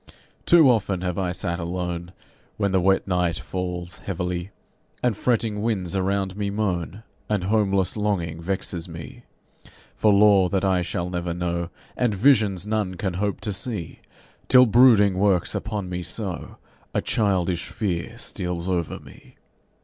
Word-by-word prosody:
Too 170 -4 +7
often 100 -7 +2
have 90 0 -2
I 90 -2 0
sat 85 -1 -3
alone 85 0 -4 0.5
When 100 -2 0
the 95 -1 +2
wet 95 +2 +2
night 90 -3 +1
falls 90 +3 -5
heavily, 90 +1 -3 0.5
And 120 -4 +2
fretting 110 -2 0
winds 100 -6 -1
around 95 0 0
me 100 -1 -2
moan, 100 -1 -2 0.3
And 105 -4 0
homeless 100 -2 +1
longing 90 -6 -1
vexes 90 -1 -3
me 80 -4 -10 0.7
For 105 - +3
lore 100 -2 +5
that 95 +2 0
I 95 -2 +2
shall 90 0 -3
never 85 -1 -2
know, 85 -1 -2 0.3
And 120 -4 +1
visions 105 -5 +3
none 105 -3 -1
can 95 0 -2
hope 100 +3 -2
to 105 - -2
see, 100 -3 -5 0.5
Till 125 0 +7
brooding 110 -5 +5
works 95 -3 +2
upon 105 -3 -3
me 90 0 -4
so 95 0 -5 0.4
A - - +2
childish 95 -5 0
fear 100 +2 -3
steals 90 -6 -4
over 85 -4 -1
me. - - -16
95 Hz, 150 wpm, -24 LUFS, 90-105 Hz, 0.7 s, Too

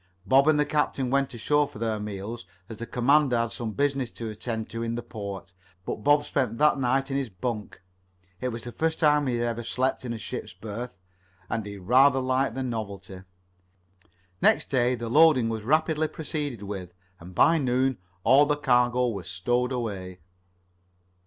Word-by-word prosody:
Bob 135 +7 +5
and 155 -1 +4
the 150 - +3
captain 140 -4 0
went 140 0 +1
ashore 145 +5 +1
for 145 - -13
their 110 -1 -1
meals, 105 +3 -6 0.2
as 110 - -7
the 115 - -6
commander 135 +1 +3
had 115 0 0
some 120 -3 -4
business 135 0 0
to 115 -2 -6
attend 110 +1 -4
to 115 +1 -6
in 115 0 -2
the 120 - -4
port, 100 -4 -7 0.3
but 105 - -4
Bob 145 0 +4
spent 125 -6 -1
that 150 0 +4
night 135 +2 +1
in 135 - 0
his 135 -3 -2
bunk. 105 0 -5 0.6
It 130 - -2
was 115 -2 -5
the 120 - -6
first 160 +5 -1
time 150 -2 +3
he 125 - 0
had 120 0 0
ever 120 0 -2
slept 130 +3 -1
in 125 - -4
a 115 - -3
ship's 110 -4 -6
berth, 110 +2 -7 0.5
and 110 -3 -2
he 100 0 -7
rather 130 +8 +4
liked 130 +1 0
the 130 - -2
novelty. 100 -6 -5
The - - -18 1.2
next - - +3
day 125 -2 +2
the 120 -1 -5
loading 145 -2 +5
was 110 -1 -3
rapidly 155 +5 +1
proceeded 145 -8 -4
with, 95 -3 -6 0.2
and 90 +2 -12
by 165 - +5
noon 130 -1 +1 0.2
all 140 +2 +6
the 150 0 +1
cargo 125 -2 +2
was 95 -6 -6
stowed 120 +9 0
away. 100 -7 -4
120 Hz, 185 wpm, -26 LUFS, 110-135 Hz, 1.2 s, all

